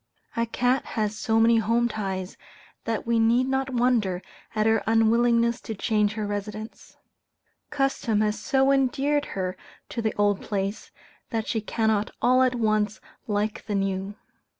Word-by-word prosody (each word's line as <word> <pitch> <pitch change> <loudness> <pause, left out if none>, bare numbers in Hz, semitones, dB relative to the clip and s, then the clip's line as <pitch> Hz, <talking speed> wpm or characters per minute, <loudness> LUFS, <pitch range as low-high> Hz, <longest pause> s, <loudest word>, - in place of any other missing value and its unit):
A 230 0 0
cat 250 +2 +1
has 215 -1 0
so 225 +1 +1
many 230 +1 +5
home 230 +2 +2
ties, 190 -4 -4 0.5
that 225 -1 -2
we 235 0 +2
need 235 +3 +3
not 265 0 0
wonder 235 -7 +1 0.3
at 215 0 +1
her 225 0 +3
unwillingness 235 +2 +3
to 220 - -6
change 210 0 +1
her 215 -1 -3
residence. 210 +2 -6 0.7
Custom 270 -6 0
has 210 0 0
so 270 0 +2
endeared 275 +2 +1
her 185 -1 -2 0.3
to 235 - -3
the 220 -1 -1
old 205 -1 +2
place, 200 0 -3 0.4
that 225 -2 -2
she 220 - -1
cannot 220 -1 0
all 255 +1 +4
at 255 -1 +3
once 215 -2 0 0.3
like 210 +1 -2
the 210 - -1
new. 195 0 -2
225 Hz, 150 wpm, -25 LUFS, 210-240 Hz, 0.7 s, many